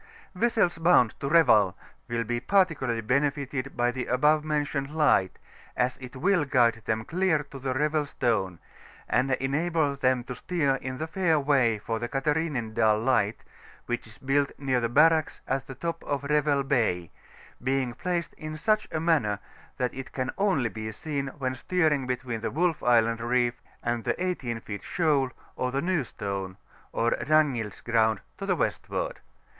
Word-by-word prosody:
— - - -29
Vessels 220 -8 +2
bound 165 -9 +5
to 140 - -2
Revel 110 - +5 0.3
will 115 0 -1
be 120 +1 -2
particularly 150 - +1
benefitted 140 +2 -1
by 120 0 +2
the 125 0 -4
above 150 +4 +3
mentioned 145 -2 -1
light, 120 - +3 0.4
as 125 0 0
it 130 0 -10
will 180 +4 +2
guide 120 -5 +2
them 110 0 -1
clear 170 -3 +1
of 135 - -9
the 130 -1 -2
Revel 150 +1 +1
Stone, 110 -10 -1 0.5
and 130 +2 +1
enable 145 +3 0
them 130 -2 +1
to 125 - -6
steer 140 -2 0
in 130 -1 -5
the 155 - -3
fair 165 -2 +1
way 135 -6 +3
for 115 +2 -3
the 120 +1 -4
Catharinendal 135 -7 +1
Light, 115 -5 +1 0.4
which 120 -1 -3
is 110 - -15
built 140 +1 +1
near 135 -3 0
the 115 - 0
barracks 155 +4 +4
at 135 0 -1
the 135 - -8
top 165 +2 -4
of 145 -1 -2
Revel 145 -1 +2
Bay, 110 - 0 0.5
being 130 -1 0
placed 175 +5 -2
in 155 0 -6
such 215 +6 +1
a 160 - -1
manner 150 -11 +2 0.4
that 125 -3 -1
it 130 0 -7
can 130 0 -2
only 185 - +1
be 110 0 -5
seen 140 +4 -4
when 130 -2 -1
steering 150 -1 +1
between 125 -3 -3
the - - -1
Wolf 165 +1 0
Island 115 -1 +3
Reef 120 0 0 0.2
and 120 -1 -1
the - - -1
18 120 -11 -3
feet 100 -2 -6
shoal, 150 -6 +1 0.3
or 125 - -1
the 135 - 0
New 170 0 0
Stone, 100 -4 -5 0.3
or 115 +1 +1
Ragnild*s 140 -9 +1
Ground, 110 -2 +2 0.2
to 195 - -4
the 185 - +2
westward. - - -2
135 Hz, 170 wpm, -27 LUFS, 120-155 Hz, 0.5 s, bound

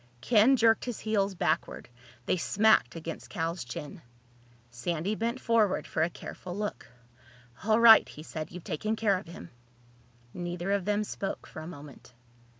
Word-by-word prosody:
Ken 230 - +5
jerked 225 -1 +3
his 245 -3 -4
heels 200 -3 0
backward. 165 -1 -1 0.4
They - - +1
smacked 205 - +3
against 165 0 -7
Cal's 165 +1 -3
chin. 145 +8 -8 0.7
Sandy 165 - -2
bent 230 +3 -2
forward 225 -6 +2
for 160 - -2
a 165 - +2
careful 180 +1 -8
look. 210 0 -4 0.8
"All 220 +1 +4
right," 230 -1 +8
he 150 - -10
said. 155 -1 -6
"You've 180 -1 -9
taken 215 +5 -2
care 205 -4 +1
of 185 - -14
him." 125 - -10 0.8
Neither 175 +1 -4
of 200 -2 0
them 210 +1 +1
spoke 200 -1 -5
for 160 - -9
a 160 - -8
moment. 145 -6 -12
185 Hz, 155 wpm, -29 LUFS, 165-215 Hz, 0.8 s, right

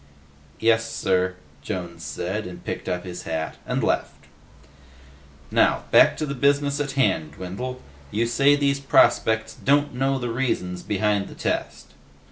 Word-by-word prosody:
"Yes, 115 0 +2
sir," 90 -1 0 0.3
Jones 85 -2 -5
said, 95 +3 -3
and 90 - -10
picked - - -4
up 90 0 -2
his 90 -1 -7
hat 80 -1 -4
and - - -1
left. - - -1 1.3
"Now, - - +3
back - - +6
to 155 - -1
the 140 - -3
business 140 +2 +2
at 145 -2 -2
hand, 95 - +1
Dwindle. 125 - -6 0.3
You 110 +7 0
say 140 +4 +4
these 140 -1 +1
prospects 110 -4 +3
don't 145 +1 +1
know 135 +2 0
the 120 -2 -3
reasons 90 -8 -2
behind 105 -1 0
the - - -11
test?" - - -3
110 Hz, 145 wpm, -24 LUFS, 90-135 Hz, 1.3 s, back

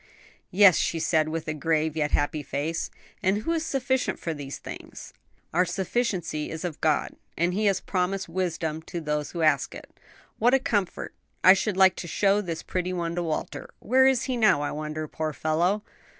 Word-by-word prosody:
"Yes," 195 -1 +6
she 165 - 0
said, 155 -1 +1
with 160 0 -3
grave 160 -1 +1
yet 150 -2 0
happy 145 +1 0
face; 150 +4 -3 0.3
"and 200 +2 +1
who 330 - -1
is 325 -1 0
sufficient 265 -3 0
for 165 - -3
these 140 -2 -6
things?" - - -10 0.4
"Our 175 +3 +4
sufficiency 180 -4 -2
is 160 +2 -5
of 165 -4 -5
God!" 155 -2 +1 0.3
"And 175 +2 +1
He 210 +3 0
has 195 -2 +3
promised 190 +1 -1
wisdom 165 -3 -2
to 175 - -4
those 150 -2 -2
who 170 -2 -2
ask 155 -3 +2
it. - - -11 0.5
What 245 +4 +5
a - - +4
comfort. 205 -7 -2 0.3
I 185 - +10
should 195 0 -1
like 190 -1 +6
to 170 - -5
show 200 +4 +2
this 170 -5 -5
pretty 185 0 -2
one 170 -2 -2
to 175 - -1
Walter. 160 -2 -4
Where 260 +3 +4
is 265 -3 +3
he 255 -2 -2
now, 215 -10 +4
I - - -2
wonder, 155 +1 -4
poor 155 0 -3
fellow?" 175 +8 0
175 Hz, 190 wpm, -26 LUFS, 155-200 Hz, 0.5 s, I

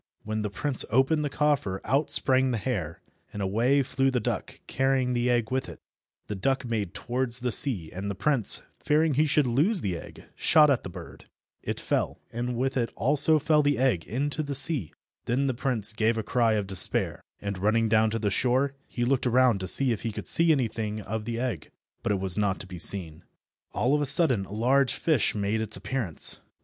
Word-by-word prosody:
When 110 0 -3
the 105 - -3
prince 130 +7 +2
opened 135 +7 +2
the 145 - -2
coffer 140 -10 0
out 140 +7 0
sprang 130 0 +1
the 120 - -1
hare, 95 - -4 0.3
and 105 - -8
away 115 +8 +1
flew 135 +1 0
the 130 -2 0
duck 110 - -4
carrying 130 -1 0
the 120 0 0
egg 120 -2 0
with 130 0 -2
it. - - -11 0.5
The - - -5
duck 130 +7 -1
made 105 -5 -3
towards 120 +2 -2
the 125 -1 -3
sea, 105 - +2
and 95 +3 -5
the 100 - -4
prince, 130 +1 +3 0.2
fearing 155 +1 +1
he 155 +4 +2
should 145 0 +2
lose 155 - +1
the 95 -3 -2
egg, - - -12
shot 150 -2 +4
at 130 - +1
the - - -8
bird. 85 - -11 0.4
It - - -4
fell, - - -2
and 120 +1 -3
with 130 +2 -1
it 115 -4 -1
also 145 +7 +4
fell 150 0 +2
the 145 -1 +1
egg 125 -11 +1
into 140 - -2
the 145 -2 -4
sea. 140 - +1 0.3
Then 130 +4 0
the 130 - 0
prince 115 -4 -2
gave 110 +1 0
a 110 - -2
cry 115 0 +1
of 105 -2 -1
despair, 95 -2 0 0.2
and, 100 -2 -5
running 110 +3 +1
down 110 0 +3
to 115 - -2
the 105 -2 -1
shore, 130 +6 +1
he 120 - -3
looked 130 0 0
around 125 -3 +3
to 95 - -5
see 130 +7 +3
if 110 - -3
he 115 - -3
could - - -7
see 165 0 +3
anything 110 -6 -2
of 105 +1 -5
the 115 0 -4
egg, 120 - -4 0.3
but - - -2
it 100 - 0
was 95 -2 0
not 100 -2 0
to - - -6
be 90 -2 -9
seen. 85 -3 +1 0.5
All 125 +3 0
of 150 - +2
a 145 - -1
sudden 130 - +4
a - - -15
large 130 +5 +1
fish 155 -10 0
made 105 +2 -1
its 110 -1 0
appearance. 120 -11 0
120 Hz, 215 wpm, -26 LUFS, 105-135 Hz, 0.5 s, shot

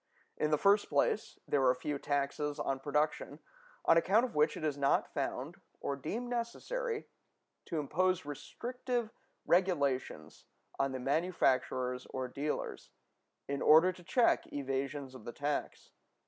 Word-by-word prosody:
In 150 - 0
the 150 - +3
first 200 +5 +4
place, 145 +8 +1
there 140 -2 +2
are 130 0 +5
few 140 +3 -3
taxes 145 +1 -1
on 135 -1 -1
production 150 +2 -1 0.5
on 165 - +6
account 205 +8 +4
of 245 - -7
which 150 +1 +2
it - - -7
is 150 -3 0
not 140 -1 +1
found - - -3 0.2
or 140 - -2
deemed 210 - -4
necessary 430 - -3 0.6
to 165 - -3
impose 180 +4 +1
restrictive 240 - -4 0.3
regulations 160 -8 0 0.3
on 135 0 +1
the 130 - -4
manufacturers 130 -4 +1
or 130 -1 -4
dealers, 145 +4 -4 0.6
in 140 0 -2
order 160 +4 +7
to 180 - -14
check 240 +7 +2
evasions 135 0 -3
of 130 - -11
the 120 - -7
tax. 145 +2 -3
150 Hz, 140 wpm, -33 LUFS, 140-185 Hz, 0.6 s, order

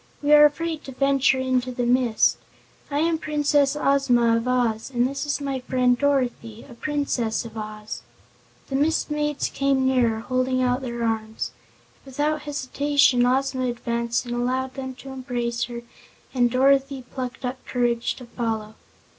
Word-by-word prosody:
We 295 +1 +4
are 300 0 +9
afraid 320 +1 -1
to 270 - -7
venture 275 0 +3
into 255 -1 0
the 245 0 -2
mist. 245 -2 +3 0.5
I 290 0 0
am 325 0 +1
Princess 290 -2 +2
Ozma 260 -5 +3
of 230 +2 -1
Oz, 240 -3 0
and 245 -2 +1
this 275 +2 -4
is 290 - 0
my 275 -2 -2
friend 250 -1 +2
Dorothy, 245 -5 -1
a 255 - -12
Princess 250 -5 -1
of 225 -1 -10
Oz." 215 0 -6 0.7
The 270 - -2
Mist 300 +2 +1
Maids 295 -1 -1
came 275 -1 +1
nearer, 240 -4 +2
holding 255 +1 0
out 250 +1 +1
their 240 -2 -4
arms. 220 -1 -2 0.5
Without 295 +3 -1
hesitation 280 -3 +2
Ozma 260 0 +1
advanced 235 0 -2
and 240 - -4
allowed 255 +2 -1
them 260 -1 -6
to 270 +2 -11
embrace 245 -2 -2
her 235 -1 -7 0.5
and 245 -2 +3
Dorothy 270 +1 +2
plucked 255 -1 -5
up 255 +1 -4
courage 240 -1 0
to 250 - -11
follow. 225 -3 -3
255 Hz, 155 wpm, -24 LUFS, 240-275 Hz, 0.7 s, are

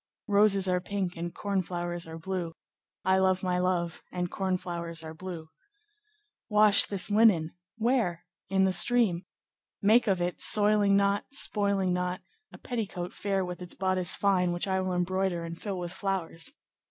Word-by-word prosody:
"Roses 200 -2 +3
are 180 -1 +1
pink 190 -1 -3
and 170 +1 -4
corn 200 0 -1
flowers 175 -1 -5
are 160 0 -8
blue, 170 -1 -4 0.5
I 190 0 +3
love 190 0 +2
my 180 -1 0
love, 175 -2 -1
and 180 -1 -3
corn 190 -1 -1
flowers 170 -2 -5
are 160 0 -7
blue. 165 -2 -8 1.0
"'Wash 210 -1 +5
this 200 0 -4
linen.'—'Where?'—'In 195 0 +1
the 190 -1 +2
stream. 200 -4 +3 0.5
Make 220 +4 +4
of 190 -3 +2
it, 175 0 -2
soiling 205 -1 +4
not, 200 0 +1
spoiling 200 -8 +2
not, 180 +1 -2 0.3
a - - -12
petticoat 195 -7 -5
fair 195 -2 -1
with 180 0 -7
its 180 - -8
bodice 185 -1 0
fine, 185 -3 +2
which 175 +3 -2
I 190 0 0
will 185 0 -2
embroider 180 -1 -1
and 165 0 -6
fill 195 +2 -5
with 175 -1 -5
flowers. 190 -3 -3
185 Hz, 155 wpm, -28 LUFS, 175-200 Hz, 1.0 s, Wash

